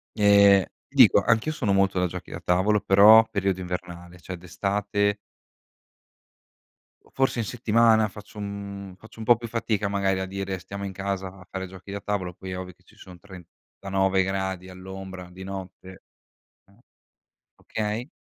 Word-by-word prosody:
Ehm, 100 -2 +6 0.2
dico - - +6
anch'io 115 +7 +1
sono 125 -9 -1
molto 95 -1 +2
da 90 - +2
giochi - - -8
da - - -6
tavolo, 100 +4 +2
però 110 +3 +7
periodo 95 -2 -1
invernale, 90 -1 -7
cioè 95 +1 -7
d'estate 100 +3 -1 1.9
o - - -23
forse 135 -2 0
in 115 - -1
settimana 115 -1 +3
faccio 105 +2 -13
un 100 -1 -7
faccio 110 +3 -16
un 110 - -6
po' 120 -1 +6
più 115 - -7
fatica 110 -3 -1
magari 100 -1 0
a 95 - -2
dire 95 0 -4
stiamo 100 +3 -8
in 100 - -4
casa 95 0 -3
a 90 - -16
fare 95 0 -5
giochi 95 +1 -12
da 100 0 -5
tavolo, 95 -4 -3
poi 95 +2 -9
è 90 - -4
ovvio 90 0 -8
che 90 - -32
ci - - -23
sono 90 -2 -13
39 95 +1 -3
gradi 95 -1 -3
all'ombra 95 0 -9
di 95 +1 -10
notte. 95 -1 -9 0.6
Eh. - - -25 0.8
Okay. 110 +4 -4
95 Hz, 160 wpm, -25 LUFS, 95-105 Hz, 1.9 s, però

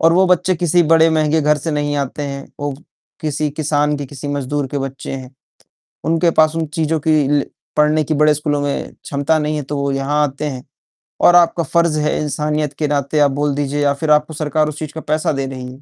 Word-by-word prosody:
और 165 0 +5
वो 190 +2 +4
बच्चे 180 +1 +2
किसी 175 +1 +3
बड़े 165 0 +5
महँगे 155 0 +2
घर 150 0 +3
से 160 +4 -3
नहीं 145 -1 -1
आते 140 +1 -3
हैं, 140 -1 -5 0.2
वो 145 0 -2 0.5
किसी 150 -1 -1
किसान 150 0 0
के, 145 - -5
किसी 145 +2 -8
मजदूर 145 0 -2
के 140 - -3
बच्चे 135 0 -5
हैं। 130 0 -7 0.7
उनके 165 +1 +2
पास 155 -1 +3
उन 165 -1 -1
चीज़ों 160 -1 0
की 155 -3 +4
ल 145 -1 +2 0.3
पढ़ने 150 +1 +3
की 155 - -1
बड़े 150 +1 +4
स्कूलों 145 0 -1
में, 145 0 -3
क्षमता 145 +3 0
नहीं 150 0 -1
है 150 - -2
तो 145 +2 -5
वह 140 -1 0
यहाँ 145 +2 0
आते 140 +1 -4
हैं 130 -4 -4 0.6
और 175 - +6
आपका 170 -1 +4
फ़र्ज़ 170 0 +1
है, 150 0 0
इंसानियत 150 0 -1
के 150 - +1
नाते 145 +1 0
आप 145 -1 +4
बोल 145 +1 0
दीजिए 145 0 -1
या 140 -1 +3
फिर 150 +2 -1
आपको 150 +1 +3
सरकार 155 0 0
उस 150 - -7
चीज़ 155 -1 -6
का 160 - -6
पैसा 155 +1 0
दे 135 -2 -2
रही 130 -1 -7
है। 130 - -16
150 Hz, 230 wpm, -18 LUFS, 140-155 Hz, 0.7 s, और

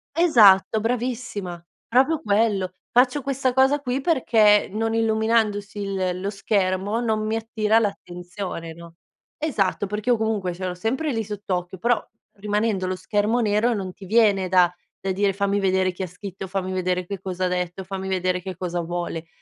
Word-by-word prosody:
Esatto 220 - +5
bravissima, 225 -7 -3 0.2
proprio 270 +6 +3
quello. 200 -3 +1 0.2
Faccio 250 +4 +3
questa 265 -1 -1
cosa 265 +3 +4
qui 265 -1 -2
perché 225 -9 +4
non 225 +2 -2
illuminandosi 220 -2 +1
il 190 -2 -2
lo 195 - -2
schermo, 195 +1 0
non 220 -2 0
mi 220 +1 0
attira 220 -1 +1
l'attenzione, 180 -4 -5
no? 170 0 -13 0.4
Esatto 210 -9 -1
perché 210 +4 -3
io 240 - +4
comunque 215 -5 -1
ce 185 +2 -6
l'ho 180 - -4
sempre 260 - -1
lì 225 -1 -1
sott'occhio 190 -3 -4
però 235 +3 +1 0.3
rimanendo 205 -1 -1
lo 185 - -1
schermo 210 +5 0
nero 220 +2 +2
non 190 -3 -4
ti 195 - -12
viene 200 -3 +3
da 180 -2 +5 0.3
da 195 - -2
dire: 200 +1 +1
"Fammi 200 +1 0
vedere 185 -1 +1
chi 185 - -5
ha 185 - -3
scritto, 190 +2 -8
fammi 185 0 -3
vedere 185 0 -1
che 200 -2 -5
cosa 185 -1 -3
ha - - +2
detto, 180 +1 -3
fammi 190 0 -5
vedere 185 -1 0
che 185 0 -6
cosa 175 -1 -2
vuole". 170 -1 -4
200 Hz, 170 wpm, -23 LUFS, 185-225 Hz, 0.4 s, Esatto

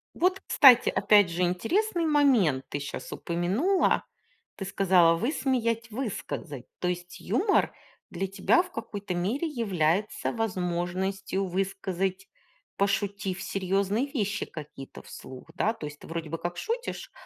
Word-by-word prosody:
Вот, 370 +2 +2
кстати, 250 -4 +7
опять 205 -4 +4
же 175 - -2
интересный 335 - +1
момент, 250 - +3
ты 145 - -3
щас 145 - -6
упомянула. 200 - +1 0.5
Ты 195 - -6
сказала: 185 -3 +4
"Высмеять, 235 - 0
высказать". 205 - -5
То 180 - -1
есть 180 0 -4
юмор 355 - +1 0.4
для 195 +3 -2
тебя 200 - +3
в 365 - -10
какой-то 205 - -5
мере 220 - -1
является 205 - 0
возможностью 190 -1 -2
высказать, 190 0 -2 0.5
пошутив, 200 -1 -1
серьёзные 195 +5 0
вещи 210 -8 -2
какие-то 150 -3 -10
вслух, 130 -1 -11
да? 220 - +1
То 155 -9 -7
есть 150 - -10
ты - - -13
вроде 165 -2 -5
бы 165 - -3
как 175 +1 -4
шутишь, 470 +2 -4
195 Hz, 130 wpm, -27 LUFS, 175-235 Hz, 0.5 s, кстати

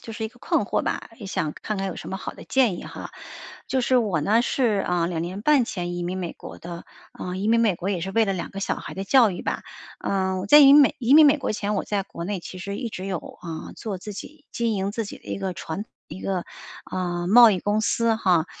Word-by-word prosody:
就 225 - -9
是 220 - -6
一 220 - -1
个 245 - -22
困 215 - +1
惑 - - -1
吧， - - -3
也 205 - -8
想 155 -6 -2
看 215 - -5
看 195 0 -2
有 185 - -6
什 - - -8
么 190 - -3
好 205 - -6
的 - - -12
建 240 -9 +2
议 - - -8
哈。 - - -8 0.6
就 265 - 0
是 255 +1 +2
我 205 -9 +1
呢 210 +10 +3
是， 235 -5 +1
呃， 175 -1 +1
2 170 -2 -2
年 185 +4 -5
半 285 -2 +4
前 175 -4 -4
移 175 - -3
民 180 +2 -3
美 180 -3 -4
国 - - -11
的， 170 0 -8 0.3
呃， 180 - -4
移 200 +3 -1
民 230 +1 +4
美 225 -5 +3
国 180 +3 -4
也 185 -4 -1
是 190 +3 -4
为 225 +2 +4
了 195 - 0
两 180 -3 -4
个 195 - -5
小 195 - -1
孩 - - -8
的 195 - -4
教 235 +2 +5
育 175 - -6
吧。 - - -2 0.4
呃， 190 -1 -1
我 190 - -5
在 295 - +8
移 285 - +9
民 295 - +9
美 280 - +4
移 245 +1 +2
民 310 +1 +9
美 290 +1 +5
国 270 - -2
前， 210 -1 -2
我 - - 0
在 200 -2 -2
国 170 - -7
内 200 +2 -2
其 185 +1 -9
实 200 +2 -5
一 240 - -3
直 190 -4 -7
有， 190 -3 -2 0.2
啊， 165 -2 -6
做 205 -4 -5
自 210 +3 -8
己 295 +9 -10
经 235 -1 0
营 195 0 -2
自 225 0 -2
己 205 - -9
的 - - -27
一 - - -4
个 190 -1 -2
传 175 +3 -5 0.2
一 190 - -9
个， 185 -3 -2 0.4
呃， 175 -1 -2
贸 230 +4 +8
易 190 - 0
公 205 +4 0
司 230 +1 +2
哈。 180 -6 +2
200 Hz, 290 characters per minute, -24 LUFS, 180-230 Hz, 0.6 s, 移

